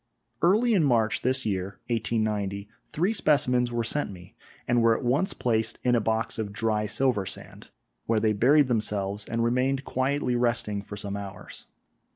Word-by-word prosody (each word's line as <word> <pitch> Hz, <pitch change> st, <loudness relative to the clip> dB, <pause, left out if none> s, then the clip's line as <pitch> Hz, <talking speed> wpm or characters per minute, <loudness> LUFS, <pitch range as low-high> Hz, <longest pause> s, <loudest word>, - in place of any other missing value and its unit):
Early 215 Hz, +8 st, +4 dB
in 185 Hz, -6 st, +3 dB
March 115 Hz, -6 st, +2 dB
this 130 Hz, +1 st, 0 dB
year 100 Hz, -2 st, -2 dB
(1890) 105 Hz, -3 st, -1 dB, 0.2 s
three 180 Hz, +8 st, 0 dB
specimens 125 Hz, -, +2 dB
were 120 Hz, -1 st, -1 dB
sent 145 Hz, +6 st, -1 dB
me 90 Hz, -3 st, -12 dB, 0.3 s
and 120 Hz, 0 st, +3 dB
were 115 Hz, -1 st, +4 dB
at -, -, -7 dB
once 140 Hz, +10 st, +1 dB
placed 115 Hz, -1 st, 0 dB
in 125 Hz, -, +2 dB
a 120 Hz, -, +3 dB
box 110 Hz, +1 st, -1 dB
of 105 Hz, -2 st, -3 dB
dry 105 Hz, -1 st, -1 dB
silver 115 Hz, -5 st, +1 dB
sand, -, -, -8 dB, 0.4 s
where 115 Hz, -1 st, +2 dB
they 110 Hz, 0 st, +2 dB
buried 140 Hz, +8 st, +4 dB
themselves 105 Hz, -3 st, -1 dB
and 115 Hz, 0 st, -1 dB
remained 130 Hz, +3 st, 0 dB
quietly 130 Hz, -1 st, 0 dB
resting 120 Hz, -4 st, 0 dB
for 100 Hz, +1 st, -9 dB
some 100 Hz, 0 st, -5 dB
hours. 100 Hz, -1 st, -9 dB
115 Hz, 170 wpm, -26 LUFS, 105-130 Hz, 0.4 s, Early